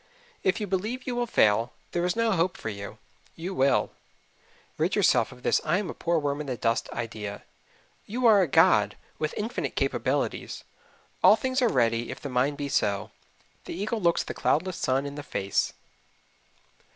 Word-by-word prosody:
If 190 +4 +1
you 210 - -2
believe 210 +7 -2
you 250 - -2
will 240 0 0
fail, 115 - +3 0.2
there 175 - -1
is 180 0 0
no 230 -1 +2
hope 180 -1 +1
for - - -5
you. 100 -1 -7 0.4
You 180 +4 -5
will. 135 -5 +2 0.9
Rid - - +1
yourself - - +3
of 125 0 -14
this - - +2
I 160 +3 +2
am 205 -2 -2
a - - -8
poor 170 0 0
worm 145 -1 -1
in 150 - -6
the 125 -2 -3
dust 115 +1 0
idea. 110 -3 -5 0.6
You 245 +4 -2
are 215 -4 +7
a 180 - +2
god, - - +4 0.2
with 155 0 -2
infinite 220 +3 -3
capabilities. - - -1 0.6
"All - - +8
things 260 0 -1
are 245 - +4
ready 115 -2 +1
if - - -6
the 145 - -6
mind 130 +3 +1
be 145 -1 -3
so." 100 -7 0 0.5
The - - -6
eagle 215 +4 -2
looks 170 -1 +2
the - - -5
cloudless 180 +4 0
sun 135 +2 0
in 140 - -5
the 145 - -6
face. 100 -8 -1
155 Hz, 185 wpm, -27 LUFS, 125-205 Hz, 0.9 s, All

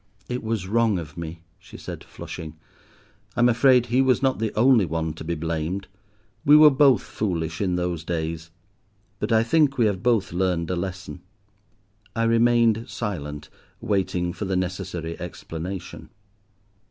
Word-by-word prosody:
"It 125 0 -3
was 110 -4 -2
wrong 110 -1 +2
of 80 -3 -7
me," 85 0 -7 0.2
she - - -13
said, - - -8
flushing. 80 -1 -8 0.8
"I'm 120 0 +4
afraid 125 +1 +4
he 125 +2 +2
was 130 0 +2
not 130 -3 +1
the 110 -1 -1
only 120 -1 +5
one 80 -2 -2
to 80 - -9
be 85 +1 -2
blamed; 85 +4 -3 0.6
we 150 +1 +7
were 150 -1 +8
both 135 -5 +4
foolish 85 -5 -3
in 90 -3 0
those 90 -2 -2
days, 80 -1 -3 0.7
but 105 - -2
I 110 0 +4
think 145 +2 +2
we 120 - +4
have 100 -3 0
both 115 -6 +1
learned 90 -2 0
a - - 0
lesson." 90 0 -5 0.9
I 115 - +1
remained 115 -1 +3
silent, 75 -12 -5 0.3
waiting 90 -3 -1
for 105 - -5
the 95 0 -1
necessary 90 -2 -3
explanation. 90 +1 -7
95 Hz, 155 wpm, -24 LUFS, 85-115 Hz, 0.9 s, were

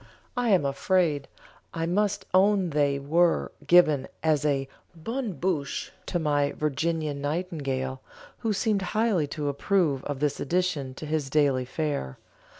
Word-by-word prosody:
I 245 -1 +1
am 185 -8 +4
afraid 150 0 +1 0.5
I 165 0 -1
must 200 +3 0
own 190 -2 +4
they 145 -1 +2
were 165 +5 +2 0.2
given 155 -5 +5 0.2
as 155 -2 +2
a 140 -2 +1 0.3
bonne 225 +6 -3
bouche 155 -3 -2 0.2
to 175 - 0
my 145 -3 +1
Virginian 155 0 -1
nightingale, 140 -5 -2 0.4
who 225 - -1
seemed 205 0 +1 0.2
highly 210 -9 +2
to 145 0 -4
approve 145 -1 +1
of 145 -2 -3
this 150 -1 0
addition 145 -5 -1
to 155 - -7
his 150 -2 -1
daily 135 -3 +2
fare. 140 - -3
155 Hz, 140 wpm, -27 LUFS, 140-185 Hz, 0.5 s, given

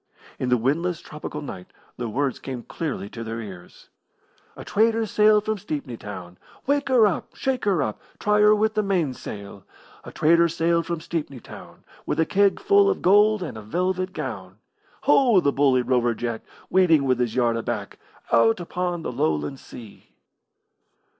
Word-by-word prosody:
In 125 - -1
the 125 - +4
windless 160 +8 0
tropical 150 -2 -7
night 90 -10 -8 0.3
the 120 -2 -3
words 135 +3 -1
came 130 -3 -6
clearly 145 -10 -4
to 115 +1 -7
their 115 0 -5
ears: 95 -5 -11 0.7
A - - -10
trader 225 +1 +2
sailed 210 0 +3
from 215 -1 -1
Stepney 145 - -5
Town, 95 -5 -9 0.3
Wake 285 0 0
her 245 -4 +5
up! 200 - -2
Shake 265 -3 -2
her 185 -8 +2
up! 110 -4 -4 0.2
Try 210 0 +1
her 210 0 +6
with 215 +1 +1
the 215 - +1
mainsail! 130 - -3 0.4
A - - -10
trader 170 +2 +4
sailed 165 +1 0
from 170 -2 -3
Stepney 150 -6 -4
Town - - -13 0.2
With - - -1
a 160 - +4
keg 200 +2 +2
full 405 -1 +4
of 400 - -2
gold 210 +1 +4
and 155 - -6
a 110 - -7
velvet 185 - -2
gown. 100 - -6 0.4
Ho, 260 -7 +5
the 140 -5 +2
bully 135 -3 +3
Rover 120 -2 +1
Jack, 115 -1 -4 0.3
Waiting 170 -6 +4
with 130 -2 +1
his 120 -2 -1
yard 120 -2 +2
aback 115 - -4 0.3
Out 115 -1 +4
upon 175 -1 -3
the - - -3
Lowland 80 - -1
Sea. 100 - -13
155 Hz, 170 wpm, -24 LUFS, 120-200 Hz, 0.7 s, her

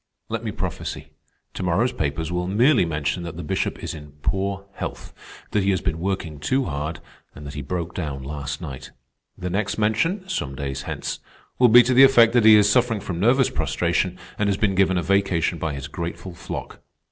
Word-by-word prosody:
"Let - - -3
me - - -2
prophesy. - - -5 0.4
To - - -6
morrow's 95 +8 +1
papers 75 +3 -2
will 90 0 -1
merely 120 +4 +4
mention 75 +2 -2
that 85 -2 -7
the 85 - -5
Bishop 95 - -2
is - - -3
in 75 -2 -11
poor 100 0 -1
health, - - -6 0.4
that 105 - +2
he 95 - +1
has 95 -2 +2
been 85 -3 -2
working 85 -5 -3
too 130 - +1
hard, 75 +1 -4 0.4
and 75 - -10
that 70 - -7
he 75 - -5
broke 85 +4 -4
down 70 -6 -4
last 70 0 -5
night. 65 -1 -7 0.5
The 90 0 -4
next 100 +3 -1
mention, 140 - 0
some 70 - -3
days 70 -1 -4
hence, - - -4 0.4
will 125 -1 +6
be 120 +2 +9
to 130 +2 +1
the 130 - +7
effect 120 -4 +6
that 120 -3 +4
he 110 -1 +9
is 105 -1 +6
suffering 115 0 +2
from 90 -3 -5
nervous 125 +6 +3
prostration 85 +5 0 0.2
and 105 -1 +2
has 100 - +1
been 100 -2 +1
given 95 -1 +3
a 85 - 0
vacation 90 -2 +1
by 80 -3 -2
his 70 0 -6
grateful 85 +3 -6
flock. 80 - -7
90 Hz, 205 wpm, -23 LUFS, 80-105 Hz, 0.5 s, be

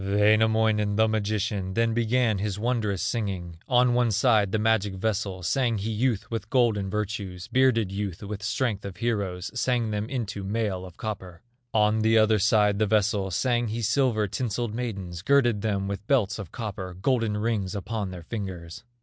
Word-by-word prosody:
Wainamoinen, 105 +1 +3
the 110 +1 +4
magician, 105 -3 -1
Then 115 0 +2
began 115 -2 +1
his 100 -1 -2
wondrous 110 -4 -1
singing. 95 -7 -3
On 125 -1 +4
one 120 -1 +3
side 110 -2 +3
the 110 - +1
magic 105 -2 +1
vessel, 95 -2 -2
Sang 120 +2 +1
he 105 +3 -3
youth 110 -1 -1
with 110 -2 -4
golden 115 -6 +2
virtues, 100 -3 -4
Bearded 125 -6 +2
youth 100 -1 -4
with 100 0 -5
strength 110 -2 -1
of 100 -3 -7
heroes, 100 -5 -2
Sang 120 -2 0
them 105 +2 -2
into 115 -7 -4
mail 100 -2 -2
of 90 - -15
copper. 95 -5 -6 0.3
On 105 0 +3
the 110 +1 +3
other 110 -1 +4
side 105 0 +3
the 110 - +2
vessel, 105 -2 +1
Sang 120 +5 +1
he 115 +2 -3
silver 115 -2 +2
tinselled 115 +1 -2
maidens, 100 -8 -4
Girded 120 -2 +3
them 100 -2 -1
with 100 +1 -5
belts 110 -6 +2
of 95 -6 -7
copper, 95 -5 -5
Golden 110 +1 0
rings 105 -4 -1
upon 100 +1 -3
their 90 -2 -8
fingers. 95 -1 -6
105 Hz, 170 wpm, -26 LUFS, 100-115 Hz, 0.3 s, the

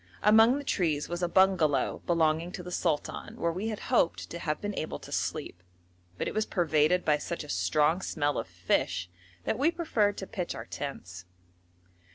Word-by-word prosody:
Among 225 +5 +6
the 285 - -5
trees 160 - 0
was 175 +1 -4
a 175 - +2
bungalow 170 -7 +3
belonging 165 0 +2
to 180 - -6
the 180 - -8
sultan 165 -4 -2
where 170 - +1
we 190 +6 -3
had 215 -2 -4
hoped 170 -8 +2
to 170 - -5
have 150 -2 -2
been 205 0 -3
able 155 - -3
to - - -12
sleep, 90 - -3 0.6
but - - -2
it - - -3
was 215 0 0
pervaded 165 0 +2
by 150 -1 +3
such 170 +2 -4
a 150 - -12
strong 150 - +2
smell 145 -7 -1
of 115 - -5
fish 90 0 -1 0.3
that - - -1
we 290 +4 +4
preferred 240 -12 0
to 190 - -4
pitch 185 -3 -4
our - - -7
tents. 90 -10 -7
170 Hz, 190 wpm, -29 LUFS, 150-195 Hz, 0.6 s, Among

